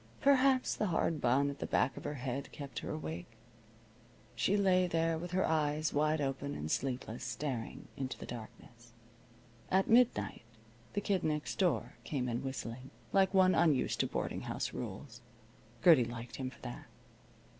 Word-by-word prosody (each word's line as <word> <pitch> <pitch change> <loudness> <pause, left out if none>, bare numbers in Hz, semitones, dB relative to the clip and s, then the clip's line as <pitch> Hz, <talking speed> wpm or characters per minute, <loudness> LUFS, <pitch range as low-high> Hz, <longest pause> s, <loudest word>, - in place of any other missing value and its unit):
Perhaps 270 -1 +4
the 210 - -1
hard 165 -3 0
bun 135 +4 +3
at 140 - -10
the - - -3
back 130 - +2
of - - -9
her 145 0 -2
head 130 +1 -4
kept 140 -2 -6
her - - -6
awake. 80 +8 -6 1.0
She 200 - +2
lay 185 -2 +4
there 165 -1 +1
with 175 +2 -5
her 185 +2 +1
eyes 155 -1 +1
wide 155 +1 +2
open 140 0 -2
and 75 +1 -4
sleepless, 125 -3 -2
staring 130 -7 -4
into 135 -1 -4
the - - -8
darkness. 120 0 -10 0.8
At 190 +1 +3
midnight 240 +1 +3 0.5
the 205 - 0
Kid 195 -3 0
Next 150 -1 -2
Door 125 - +1
came 125 +1 -2
in 120 +1 -1
whistling, 130 -1 -5 0.2
like 190 -1 +4
one 185 -1 +5
unused 155 -6 +2
to - - +2
boarding - - -3
house - - -3
rules. 120 +3 -7 0.6
Gertie 155 -9 +7
liked 120 0 -7
him 130 -1 -3
for 130 - -17
that. - - -7
140 Hz, 165 wpm, -34 LUFS, 120-175 Hz, 1.0 s, Gertie